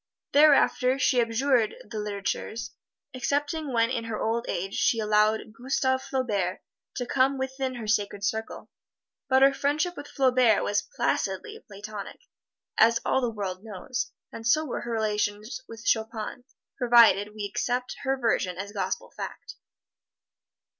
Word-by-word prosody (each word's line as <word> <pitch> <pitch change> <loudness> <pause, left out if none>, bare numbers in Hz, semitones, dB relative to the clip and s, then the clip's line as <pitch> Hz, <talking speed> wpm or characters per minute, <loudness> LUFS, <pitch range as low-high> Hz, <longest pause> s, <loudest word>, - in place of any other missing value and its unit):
Thereafter 280 -3 +5
she 255 -2 +3
abjured 235 0 +1
the 220 - -7
litterateurs, 210 +2 -3 0.4
excepting 290 +3 -1
when 230 0 +2
in 230 -3 -2
her 225 -2 -4
old 230 +2 -1
age 195 +3 -3
she 245 - +2
allowed 215 0 +2
Gustave 260 +2 0
Flaubert 205 -9 -2 0.3
to 245 - -2
come 270 +2 +2
within 265 0 -3
her 235 -2 -6
sacred 205 -1 0
circle 220 +2 -3 0.6
but 265 0 +5
her 275 0 +6
friendship 300 +6 0
with 285 0 -8
Flaubert 255 -6 +3
was 205 0 +1
placidly 440 -2 -1
platonic, 205 - -9 0.6
as 230 +1 +5
all 265 - +2
the 245 - 0
world 195 -3 -5
knows. 220 +3 -4 0.2
And 225 0 -6
so 310 +7 +3
were 270 - -4
her 240 - -5
relations 215 +2 -1
with 230 0 -11
Chopin, 220 +2 -1 0.3
provided 230 -4 +5
we 210 -1 -4
accept 245 +5 -2
her 270 -1 0
version 210 -7 0
as 200 +2 -5
gospel 205 -2 -3
fact. - - -7
230 Hz, 140 wpm, -27 LUFS, 210-260 Hz, 0.6 s, her